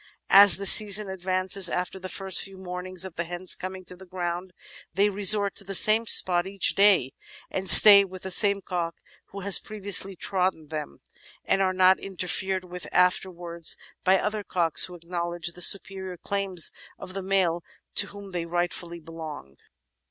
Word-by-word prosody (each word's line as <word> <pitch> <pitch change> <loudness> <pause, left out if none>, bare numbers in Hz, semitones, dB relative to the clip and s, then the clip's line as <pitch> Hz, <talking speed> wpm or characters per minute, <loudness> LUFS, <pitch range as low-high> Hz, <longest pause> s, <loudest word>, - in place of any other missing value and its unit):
As 195 -4 +7
the 200 - -7
season 205 0 +4
advances, 185 0 0
after 180 +1 -5
the 185 0 -9
first 190 -1 0
few 195 -1 -9
mornings 185 0 -7
of 190 - -12
the 170 - -3
hens 175 +2 -2
coming 185 0 -8
to 180 - -9
the 185 - -16
ground, 180 0 -6 0.4
they 200 +2 +1
resort 200 0 +3
to - - -2
the 195 0 -2
same 220 +4 +5
spot 175 -2 +3
each 195 0 0
day 195 -10 +2 0.4
and 190 0 -2
stay 200 -2 +9
with 185 -1 -12
the 190 - -7
same 200 +1 +2
cock 170 -3 -6 0.3
who 200 - -12
has 195 0 +2
previously 200 -2 -2
trodden 180 -4 -3
them, 150 - -9 0.4
and 195 - -1
are 190 - 0
not 185 0 +2
interfered 190 0 -5
with 180 -3 -9
after 180 +1 0
wards 170 -2 -2 0.3
by 190 +1 +2
other 210 +2 -5
cocks, 170 -5 +1
who 180 - -12
acknowledge 175 0 -6
the 180 - -9
superior 190 -1 0
claims 195 -2 0 0.3
of 185 - -11
the 195 - -6
male 185 -3 -2 0.3
to - - +3
whom 200 -1 -13
they 170 -2 -6
rightfully 175 0 -5
belong." 155 - -11
185 Hz, 175 wpm, -24 LUFS, 175-195 Hz, 0.4 s, stay